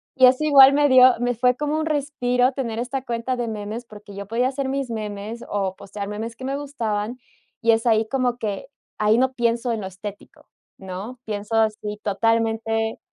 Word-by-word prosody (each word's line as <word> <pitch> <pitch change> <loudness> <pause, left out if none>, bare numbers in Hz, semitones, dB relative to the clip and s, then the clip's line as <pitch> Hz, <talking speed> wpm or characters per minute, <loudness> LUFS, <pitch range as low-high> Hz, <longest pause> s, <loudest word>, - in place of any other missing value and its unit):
Y 260 - +7
así 260 +4 +4
igual 275 -2 +8
me 290 0 +3
dio 255 0 +8
me 245 0 +1
fue 250 +1 +2
como 300 +2 -1
un 315 - -1
respiro 265 -4 +1
tener 245 -5 -4
esta 250 +2 -3
cuenta 240 +1 -2
de 240 -1 -2
memes, 215 +2 -5
porque 210 -2 -13
yo 200 0 -7
podía 240 +4 +1
hacer 275 0 -3
mis 270 -2 -2
memes 215 +1 -5
o 195 -2 -1
postear 200 0 -7
memes 220 +2 -5
que 260 - -11
me 275 +1 -2
gustaban, 235 -5 -3 0.4
y 230 0 +4
es 225 +1 +1
ahí 220 -1 +3
como 250 -1 0
que, 210 -2 -4 0.3
ahí 215 +1 +4
no 260 +1 +2
pienso 235 0 0
en 225 - -1
lo 190 - -4
estético, 195 +2 -10 0.3
¿no?, 195 +6 -7
pienso 210 +1 -4
así 215 -1 0
totalmente 225 +1 0
230 Hz, 190 wpm, -23 LUFS, 210-255 Hz, 0.4 s, igual